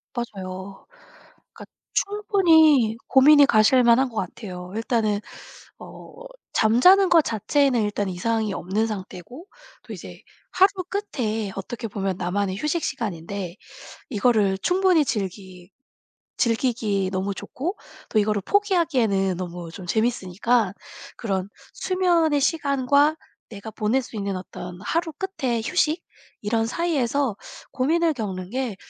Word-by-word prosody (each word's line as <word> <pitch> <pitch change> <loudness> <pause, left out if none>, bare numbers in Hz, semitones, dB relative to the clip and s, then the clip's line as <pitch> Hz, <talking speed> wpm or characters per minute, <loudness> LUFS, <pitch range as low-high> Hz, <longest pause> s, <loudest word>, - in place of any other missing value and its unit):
맞아요. 195 -4 -7 0.7
그러니까 - - -11 0.3
충분히 325 - +3
고민이 285 +2 +7
가실만한 240 +2 +4
것 230 - -15
같아요. 180 -2 -6
일단은 225 -2 0 0.6
어 - - -12 0.4
잠자는 360 - +5
것 340 -2 +6
자체는 240 +2 +1
일단 205 -1 -2
이상이 215 +3 -1
없는 200 +5 -1
상태고 210 - -8 0.4
또 - - -9
이제 - - -10 0.3
하루 385 +2 +5 0.2
끝에 225 - -3
어떻게 225 +4 -5
보면 195 -3 -3
나만의 190 +2 -2
휴식 300 +7 -1
시간인데 185 -3 -4 0.6
이거를 210 -4 +2
충분히 360 - +3
즐기 190 -5 -5 0.7
즐기기 225 -5 0
너무 195 +1 -2
좋고 340 - -5 0.3
또 220 - +2
이거를 210 -1 +1
포기하기에는 265 - +1
너무 175 -2 -6
좀 180 +1 -9
재밌으니까 220 0 0 0.4
그런 195 -4 -2 0.3
수면의 345 -5 +1
시간과 285 0 +2 0.3
내가 215 0 -8
보낼 220 +5 0
수 240 - -10
있는 200 -2 -2
어떤 180 -1 -8
하루 330 +8 -1
끝에 265 - -3
휴식 325 +2 0 0.4
이런 225 +2 0
사이에서 280 - 0 0.4
고민을 320 +5 +1
겪는 190 -6 -5
게 250 -4 -3
225 Hz, 270 characters per minute, -23 LUFS, 195-285 Hz, 0.7 s, 고민이